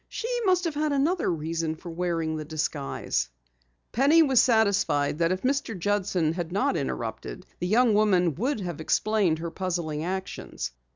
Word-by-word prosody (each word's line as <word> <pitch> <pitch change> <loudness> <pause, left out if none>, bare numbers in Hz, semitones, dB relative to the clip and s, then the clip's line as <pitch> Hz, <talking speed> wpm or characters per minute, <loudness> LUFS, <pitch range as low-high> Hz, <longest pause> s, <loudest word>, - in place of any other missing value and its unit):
"She 460 - -4 0.2
must 365 -1 +3
have 335 -3 -1
had 300 0 0
another 305 +6 +1
reason 165 0 -2
for 170 +1 -9
wearing 165 -2 -1
the 155 - -4
disguise." 150 - -2 0.6
Penny 290 +7 +5
was 265 -5 +5
satisfied 200 - +2
that 165 0 +2
if 185 0 -2
Mr. 265 -5 -1
Judson 185 -4 0
had 175 -1 -4
not 255 +10 +1
interrupted, - - -4
the 180 - -2
young 230 +3 +4
woman 190 -6 +3
would 235 - -2
have 175 -4 -5
explained 200 -1 +1
her 165 +1 -5
puzzling 170 -4 -3
actions. 190 - -4
185 Hz, 160 wpm, -26 LUFS, 165-235 Hz, 0.6 s, Penny